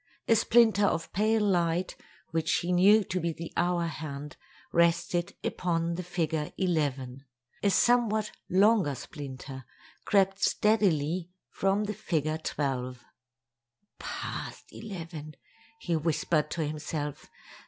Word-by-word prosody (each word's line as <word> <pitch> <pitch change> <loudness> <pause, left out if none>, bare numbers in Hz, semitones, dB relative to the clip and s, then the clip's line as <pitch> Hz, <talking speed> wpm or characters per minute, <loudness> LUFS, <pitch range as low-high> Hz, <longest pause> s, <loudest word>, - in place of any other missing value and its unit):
A 230 - +5
splinter 220 -2 +4
of 165 -3 -2
pale 215 +3 +2
light, 175 -2 +1 0.4
which 160 0 0
he 175 +1 0
knew 200 +4 +6
to 185 -1 -2
be 170 -1 -1
the 165 +1 -8
hour 175 -1 +1
hand, 150 -3 -6 0.4
rested 170 +1 +2
upon 170 -1 -1
the 175 - -3
figure 165 -4 -2
11. 140 -8 -1 0.4
A 200 - +3
somewhat 220 -1 +3 0.2
longer 195 -5 +4
splinter 130 0 -8 0.4
crept 195 -1 +2
steadily 180 -5 +2 0.2
from 195 +2 +1
the 210 0 -2
figure 160 -6 -1
12. 130 -5 -3 1.0
"Past - - -6
eleven," 165 -7 -7 0.4
he 175 - -1
whispered 155 -1 +1
to 160 -2 -2
himself. 150 -1 -4
170 Hz, 115 wpm, -29 LUFS, 150-195 Hz, 1.0 s, knew